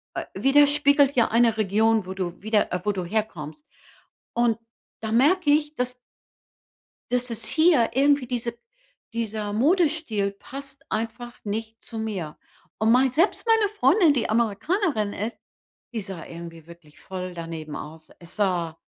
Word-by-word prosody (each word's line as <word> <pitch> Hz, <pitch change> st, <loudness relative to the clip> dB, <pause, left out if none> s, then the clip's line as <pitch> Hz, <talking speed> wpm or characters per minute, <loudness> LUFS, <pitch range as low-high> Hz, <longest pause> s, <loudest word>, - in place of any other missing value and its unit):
äh, -, -, -3 dB
widerspiegelt 285 Hz, 0 st, +5 dB
ja 235 Hz, -3 st, +4 dB
eine 230 Hz, -1 st, +3 dB
Region, 220 Hz, +1 st, +2 dB
wo 190 Hz, -, -4 dB
du 180 Hz, -2 st, -4 dB
wieder, 215 Hz, +1 st, +1 dB
äh 180 Hz, -, -1 dB
wo 210 Hz, -, +1 dB
du 190 Hz, -3 st, -3 dB
herkommst. 180 Hz, -, -4 dB, 0.7 s
Und, 235 Hz, -1 st, +2 dB, 0.4 s
da 220 Hz, -1 st, -3 dB
merke 290 Hz, +7 st, +4 dB
ich, 300 Hz, 0 st, +1 dB
dass 250 Hz, -1 st, -3 dB, 1.1 s
Dass 250 Hz, 0 st, +1 dB
es 230 Hz, -1 st, -3 dB
hier 315 Hz, -6 st, +4 dB
irgendwie 280 Hz, 0 st, +3 dB
diese 235 Hz, -1 st, -3 dB, 0.6 s
dieser 215 Hz, -2 st, -3 dB
Modestil 290 Hz, -, +2 dB
passt 275 Hz, +6 st, -11 dB
einfach 230 Hz, +2 st, -4 dB
nicht 220 Hz, +2 st, -4 dB
zu 225 Hz, -, -8 dB
mir. 195 Hz, -9 st, -4 dB, 0.4 s
Und 220 Hz, +1 st, +3 dB
mei 260 Hz, +2 st, +5 dB
selbst 335 Hz, -, +1 dB
meine 445 Hz, -2 st, +4 dB
Freundin, 335 Hz, -, +4 dB
die 250 Hz, -, -1 dB
Amerikanerin 225 Hz, -, 0 dB
ist, 225 Hz, +3 st, -4 dB, 0.5 s
die 230 Hz, -, -2 dB
sah 190 Hz, -4 st, -7 dB
irgendwie 165 Hz, -1 st, -10 dB
wirklich 170 Hz, -3 st, -16 dB
voll 185 Hz, -1 st, -6 dB
daneben 165 Hz, -3 st, -6 dB
aus. 155 Hz, +1 st, -10 dB
Es 170 Hz, 0 st, -10 dB
sah 175 Hz, -6 st, 0 dB
225 Hz, 145 wpm, -25 LUFS, 195-275 Hz, 1.1 s, widerspiegelt